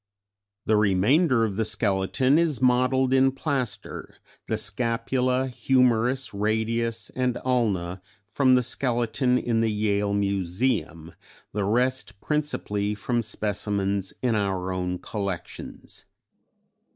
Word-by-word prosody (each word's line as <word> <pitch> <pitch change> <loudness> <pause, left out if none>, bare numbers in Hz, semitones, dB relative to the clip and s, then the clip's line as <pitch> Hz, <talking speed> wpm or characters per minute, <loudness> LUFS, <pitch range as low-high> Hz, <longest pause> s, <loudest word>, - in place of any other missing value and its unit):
] 100 0 -63
"The 110 - +3
remainder 115 - +3
of 100 -3 -4
the 110 - +2
skeleton 110 +6 +1
is 160 -6 +1
modelled 130 +1 +3
in 135 0 +4
plaster, 135 -3 -4 0.3
the - - -1
scapula, 125 +2 0
humerus, 125 0 +1
radius 110 +2 -1
and 125 -1 -1
ulna 100 -8 0 0.2
from 130 +5 +3
the 125 - +3
skeleton 125 +1 0
in 115 -2 0
the 115 -1 +1
Yale 105 -1 0
Museum, 95 -3 -1 0.4
the 100 -1 -1
rest 120 -2 0
principally 105 -9 -1
from 120 +3 -1
specimens 100 -2 -1
in 125 -2 +2
our 95 -3 -1
own 90 0 -2
collections. 100 -3 -6
110 Hz, 115 wpm, -25 LUFS, 100-125 Hz, 0.4 s, in